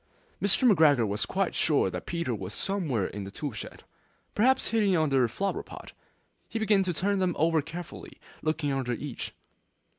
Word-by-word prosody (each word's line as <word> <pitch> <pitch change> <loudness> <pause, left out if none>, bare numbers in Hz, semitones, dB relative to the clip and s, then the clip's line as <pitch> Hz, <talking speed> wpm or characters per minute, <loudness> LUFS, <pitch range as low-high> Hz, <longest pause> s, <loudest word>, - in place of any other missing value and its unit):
Mr. 205 +6 +4
McGregor 150 - +5
was 100 +1 -1
quite 195 -1 0
sure 145 -11 +2
that - - -6
Peter 170 -7 -2
was 100 -2 -5
somewhere 160 - -1
in 100 +1 -5
the 95 - -7
tool 145 +8 -5
shed, 105 - -9 0.5
perhaps 260 +5 +3
hidden 210 -4 +2
underneath 135 -6 +2
a - - -14
flower 200 0 -1
pot. - - -11 0.6
He - - -3
began 210 -3 +3
to 185 -2 -1
turn 200 +4 0
them 185 -2 +1
over 160 0 +3
carefully, 165 +3 -9 0.2
looking 155 -2 -1
under 130 -3 -1
each. 135 +2 -6
160 Hz, 175 wpm, -28 LUFS, 130-195 Hz, 0.6 s, McGregor